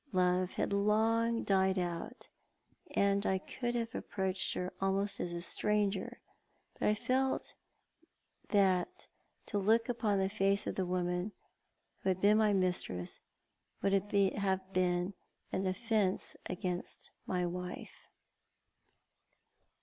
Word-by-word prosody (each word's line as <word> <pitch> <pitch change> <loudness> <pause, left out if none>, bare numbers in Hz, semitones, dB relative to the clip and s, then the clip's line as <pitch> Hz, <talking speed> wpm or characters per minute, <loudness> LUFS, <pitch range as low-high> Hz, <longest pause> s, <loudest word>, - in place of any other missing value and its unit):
Love 180 0 +2
had - - -1
long 225 +3 +2
died 190 -1 +2
out, 175 +7 -4 0.7
and 200 0 +3
I 190 -2 +2
could 240 +5 -4
have 230 -1 -2
approached 190 -1 -2
her 180 +1 -3
almost 195 +1 0
as 175 - -2
a 170 0 -4
stranger, 205 0 -1 0.5
but - - -1
I 210 - +4
felt 260 +4 0 1.0
that 200 - +2 0.4
to 205 - -1
look 225 +4 +3
upon 220 -4 +1
the 190 0 +2
face 195 0 +4
of - - -2
the 185 -2 -1
woman 180 +2 -1 0.7
who - - -1
had 185 -1 +1
been 210 +3 +5
my 215 -1 +4
mistrqps 180 - 0 0.6
would 195 0 +2
be 200 -2 +3
an 190 -2 0 0.5
offence 200 0 0
against 180 0 -4 0.2
my 180 -1 0
wife. 180 +1 -6
195 Hz, 120 wpm, -33 LUFS, 185-210 Hz, 1.0 s, been